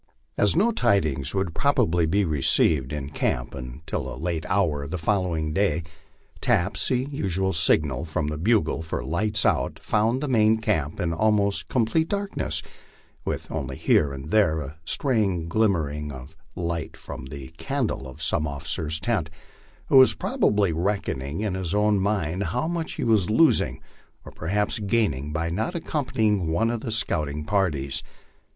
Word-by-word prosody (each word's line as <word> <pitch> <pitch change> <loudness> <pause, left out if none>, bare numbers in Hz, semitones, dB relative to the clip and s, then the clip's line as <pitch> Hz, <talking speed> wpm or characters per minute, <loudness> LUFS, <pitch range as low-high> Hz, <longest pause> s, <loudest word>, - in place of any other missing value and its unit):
As 105 - +3
no 210 +8 +3
tidings 100 - +1
would 95 -4 -1
probably 100 - +2
be 100 +5 +2
re 75 -4 -1
ceived 65 -2 +4
in 75 -1 -5
camp - - -1
until 65 +5 -5
a - - -7
late 85 -1 -3
hour 85 -7 +1
of 70 - -6
the 90 - -3
following 85 -4 0
day, 85 -4 +1 0.6
taps, 90 +4 +2
the 130 +1 0
usual 95 -7 -1
signal 80 -3 +3
from 80 -1 -2
the 75 0 -3
bugle 105 -2 +2
for 80 - -4
"lights 105 +5 0
out," - - +1
found 110 +4 +1
the - - -1
main 110 -3 +4
camp 80 -8 -1
in 85 -1 0
almost 100 +1 +1
complete 130 +7 +1
darkness, 195 - -2 0.6
with - - -4
only 65 -4 -4
here 70 - +3
and 70 +3 -7
there 95 -8 +3
a 75 +3 -8
stray 105 - 0
glimmering 80 -7 0
of 65 +3 -10 0.2
light 85 -2 -3
from - - -8
the 65 0 -8
can 140 -2 -1
dle 65 -10 -4
of 65 - -9
some 75 - +1
officer's 75 +2 -3
tent, 95 -6 -1 0.6
who - - +4
was 130 - +6
probably 100 -4 +1
reckoning 80 -4 -2
in 105 -3 -1
his 95 -1 -2
own 105 -1 +3
mind 95 -2 -1
how 90 - -1
much 170 -1 -3
he - - -4
was 110 -6 +2
losing 155 +9 +3 0.5
or - - -9
perhaps 105 +7 -1
gaining 100 - 0
by 80 +2 -2
not 110 - -2
accompanying 110 - 0
one 110 +9 +1
of 120 -2 -3
the 115 - -4
scout 85 -9 +1
ing 75 +1 -5
parties. 75 -8 0
90 Hz, 165 wpm, -25 LUFS, 75-110 Hz, 0.6 s, was